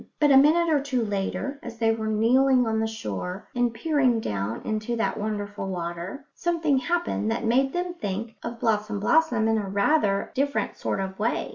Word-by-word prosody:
But 295 -1 +4
a - - +7
minute 310 +5 +5
or 295 - +4
two 260 -4 -1
later, 205 +7 -3
as 235 -1 -8
they 225 -1 +2
were 220 -1 -2
kneeling 250 +4 +3
on 220 -1 0
the 220 - 0
shore 180 - -5
and 245 -1 +1
peering 255 -1 +1
down 105 - -3
into 215 +2 -2
that 225 - 0
wonderful 205 -2 -4
water, 175 - -5
something 330 -5 +1
happened 340 -6 -1
that 230 +1 -1
made 265 +4 +2
them 355 +2 -2
think 220 - -4
of 235 0 -6
Blossom 215 -2 0
blossom 240 -1 +3
in 225 0 +2
rather 200 -2 +2
a - - -15
different 280 +2 -1
sort - - -2
of 190 0 -5
way. 225 +3 -1
225 Hz, 185 wpm, -25 LUFS, 205-275 Hz, -, a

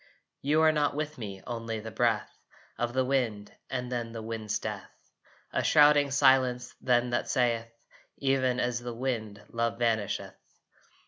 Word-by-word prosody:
You 150 +3 +3
are 160 - +6
not 150 -2 +1
with 155 -1 -4
me, 100 -4 -7
only 115 -2 -4
the 110 +1 -7
breath - - 0 0.4
Of 120 0 -2
the 130 0 +2
wind 120 -6 -1 0.2
and 125 -1 -3
then 120 -2 -3
the 115 - -5
wind's 110 -2 -3
death. - - -5 0.6
A - - +1
shrouding 145 -1 +6
silence 130 -2 +3
then 125 -1 +2
that 120 - -1
saith, 115 -2 +1 0.5
"Even 130 -2 +1
as 125 -1 0
wind 115 -4 -4
love 115 0 -1
vanisheth." 115 -4 -1
125 Hz, 145 wpm, -29 LUFS, 115-135 Hz, 0.6 s, are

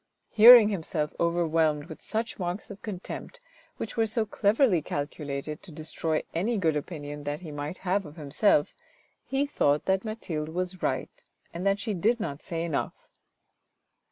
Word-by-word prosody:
Hearing 230 0 +10
himself 160 -5 -2
overwhelmed 165 -3 +1
with 160 -2 -10
such 225 0 -3
marks 180 +3 -4
of 200 - -10
contempt 210 - -7 0.4
which 225 - -5
were 225 -1 +2
so 220 +1 0
cleverly 205 - +2
calculated 145 0 -4
to 180 - -12
destroy 155 0 -2
any 215 +8 0
good 165 -5 +1
opinion 145 -1 -5
that 145 +3 -3
he 165 -4 -8
might 145 +4 -5
have 195 +2 +1
of 150 - -12
himself, 150 +1 +2 0.5
he 270 +1 0
thought 150 - +1
that 190 0 +1
Mathilde 175 -9 -4
was 180 +2 -3
right, - - -3 0.3
and 175 +3 -2
that 195 0 +3
she 210 +1 -3
did 220 +7 +1
not 145 -9 -4
say 165 -2 -3
enough. 160 -4 -4
175 Hz, 155 wpm, -28 LUFS, 150-210 Hz, 0.5 s, Hearing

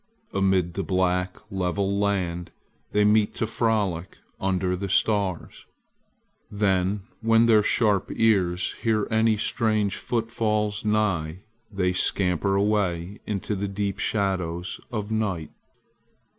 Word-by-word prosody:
Amid 95 -3 +1
the 100 - -2
black 90 +1 0
level 95 +1 -1
land 90 -4 -1 0.4
they 105 0 +3
meet 105 0 +3
to - - -1
frolic 105 -6 -1 0.2
under 95 -1 0
the 100 +2 -4
stars. 100 -3 0 0.8
Then 100 -1 0 0.2
when 115 +1 +4
their 110 -2 +5
sharp 105 -2 +1
ears 90 -5 +2
hear 110 -2 +1
any 110 -1 +3
strange 110 -2 0
footfalls 110 -3 -1
nigh 95 -6 0 0.3
they 90 -2 0
scamper 95 0 +1
away 100 -2 0
into 105 0 -2
the 100 +1 -2
deep 100 -1 -3
shadows 95 -4 -1
of 110 -2 -4
night. 100 -8 -2
100 Hz, 115 wpm, -25 LUFS, 90-105 Hz, 0.8 s, their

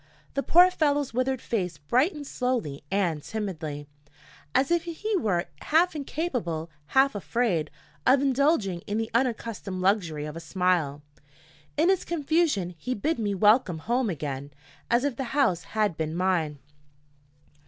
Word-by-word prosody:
The 275 - 0
poor 355 +5 +6
fellow's 290 -6 +1
withered 255 +1 0
face 180 -8 -2
brightened 270 - +1
slowly 245 - -2
and 175 -6 0
timidly, 160 -8 -5 0.7
as 270 +5 +3
if 345 -1 +2
he 405 +6 -2
were 190 - +1 0.2
half 335 +3 +3
incapable, 245 - -3 0.3
half 270 +1 +5
afraid, 205 -6 0 0.4
of 265 +1 +6
indulging 270 - +2
in 205 - -1
the 225 0 -2
unaccustomed 230 -6 -1
luxury 180 -6 +1
of 150 0 -6
a - - -5
smile. 165 -4 0 0.7
In 325 +4 +4
his 380 -2 +2
confusion 310 - 0
he 255 +10 -2
bid 305 +8 -1
me 205 -2 -1
welcome 205 -3 +4
home 240 +7 0
again, 140 -4 -4 0.4
as 240 +2 +3
if 280 -5 -1
the 270 - -2
house 185 - +2
had 210 -5 0
been 160 0 -2
mine. 170 -5 0
220 Hz, 145 wpm, -27 LUFS, 170-275 Hz, 0.7 s, poor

